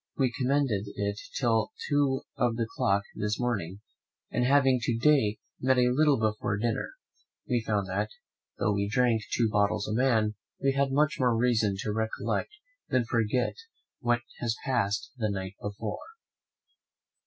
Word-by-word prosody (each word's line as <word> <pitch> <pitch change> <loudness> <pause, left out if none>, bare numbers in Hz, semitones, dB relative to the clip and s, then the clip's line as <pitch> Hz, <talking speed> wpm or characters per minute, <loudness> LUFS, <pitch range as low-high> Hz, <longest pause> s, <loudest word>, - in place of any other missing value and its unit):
We 130 -3 +2
commended 130 -6 +1
it 100 0 -2 0.2
till 115 -4 +1
two 140 -2 +2
of 120 -2 +1
the 115 0 0
clock 100 0 +2
this 105 +1 -2
morning; 105 -6 -2 0.5
and 125 - +1
having 135 0 +4
to 115 0 0
day 120 -5 +3 0.2
met 130 0 +3
a 125 0 +4
little 150 -1 +4
before 105 -1 0
dinner, 115 +2 -1 0.5
we 120 -2 +1
found 105 -3 -1
that, 95 +1 -1 0.5
though 110 - +1
we 100 0 -1
drank 120 -1 +2
two 115 - +2
bottles 105 -1 +1
a 110 - -2
man, 110 -3 +2 0.3
we 135 0 +2
had 140 0 +1
much 145 0 +2
more 125 -3 +3
reason 115 -4 +2
to 105 - -2
recollect 110 0 -1 0.4
than 125 -2 +2
forget 115 +2 +1 0.5
what 120 -2 +1 0.2
had 120 - -2 0.2
passed 115 -6 0
the 110 -3 0
night 95 -1 -4
before. 105 +1 -4
115 Hz, 155 wpm, -28 LUFS, 105-130 Hz, 0.5 s, having